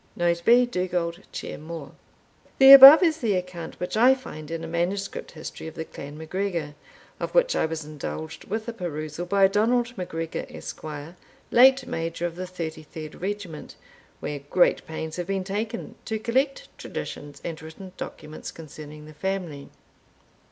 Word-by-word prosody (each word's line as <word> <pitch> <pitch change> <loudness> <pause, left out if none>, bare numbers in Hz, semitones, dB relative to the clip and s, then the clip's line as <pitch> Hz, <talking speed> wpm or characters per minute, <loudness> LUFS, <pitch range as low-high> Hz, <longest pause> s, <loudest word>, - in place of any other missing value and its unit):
Note 170 0 +1
B. 245 +4 +6
Dugald 180 -5 -2
Ciar - - -6
Mhor. 160 -1 -8 0.7
The 270 0 +10
above 275 +5 +12
is 320 -2 +2
the 215 -5 +1
account 180 -2 -5
which 180 - -3
I 250 +4 +6
find 155 - -9
in 165 0 -4
a - - -5
manuscript 175 +4 -3
history 160 0 -8
of 160 - -9
the 160 - -5
clan 145 0 -9
MacGregor, 165 -2 -3 0.5
of - - -4
which - - +4
I - - +2
was 160 -1 -5
indulged 155 +1 -7
with 220 +2 -4
a 235 - -3
perusal 160 -3 -5
by 195 +1 +5
Donald 235 +5 +1
MacGregor, 165 -2 -4
Esq., - - -8 0.7
late 260 +2 +6
Major 165 -3 -3
of 170 -1 -3
the 185 +1 -5
33d 160 -3 -7
regiment, 190 -5 -5 0.5
where 145 -1 -4
great 145 +6 +2
pains 160 0 -5
have 175 -1 -3
been 195 -1 -1
taken 215 +4 -4
to 220 - -2
collect 265 - 0
traditions 145 -1 -7
and 165 -3 -5
written 160 +4 -10
documents 155 -3 -8
concerning 150 -1 -11
the 155 - -12
family. 175 -5 -4
175 Hz, 160 wpm, -25 LUFS, 160-215 Hz, 0.7 s, above